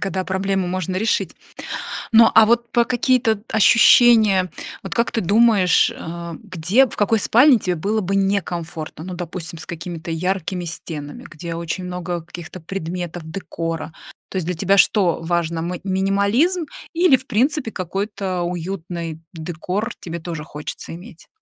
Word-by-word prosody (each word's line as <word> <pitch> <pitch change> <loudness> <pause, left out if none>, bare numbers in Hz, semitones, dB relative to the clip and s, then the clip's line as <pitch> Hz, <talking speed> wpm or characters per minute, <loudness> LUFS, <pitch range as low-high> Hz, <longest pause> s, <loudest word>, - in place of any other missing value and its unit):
когда 190 -1 -2
проблему 190 0 -1
можно 185 0 -2
решить. 215 +3 0 0.8
Но, 225 0 +7
а 225 - +8
вот 235 +1 +1
по 235 -1 +3
какие-то 245 -3 +1
ощущения, 220 -3 +6 0.3
вот - - -5
как 235 -1 +1
ты 225 - -1
думаешь, 205 -1 +4
э, 170 +1 -7
где, 195 +6 +3
в - - -9
какой 215 +2 +2
спальне 245 +5 +5
тебе 180 -3 -1
было 205 +7 -1
бы 195 +1 -1
некомфортно? 175 -5 -2
Ну, 180 +1 -6
допустим, 170 -1 -6
с - - -9
какими-то 170 -1 -6
яркими 180 +1 -2
стенами, 155 -3 -6
где 165 +2 -6
очень 170 +2 -4
много 180 -1 -4
каких-то 170 +2 -10
предметов, 175 -1 -5
декора. 165 -2 -4 0.4
То - - -11
есть 180 - -2
для 180 +1 -2
тебя 195 +4 +2
что 190 -4 +4
важно: 165 -1 -1
мы 175 +1 -4
минимализм 200 - +1 0.3
или, 340 -5 +5
в 260 +1 -14
принципе, 260 +2 +1
какой-то 195 0 -3
уютный 175 -2 -4
декор 180 +7 -4
тебе 170 0 -6
тоже 165 -2 -6
хочется 150 +1 -7
иметь? 175 -1 -13
185 Hz, 150 wpm, -21 LUFS, 170-215 Hz, 0.8 s, а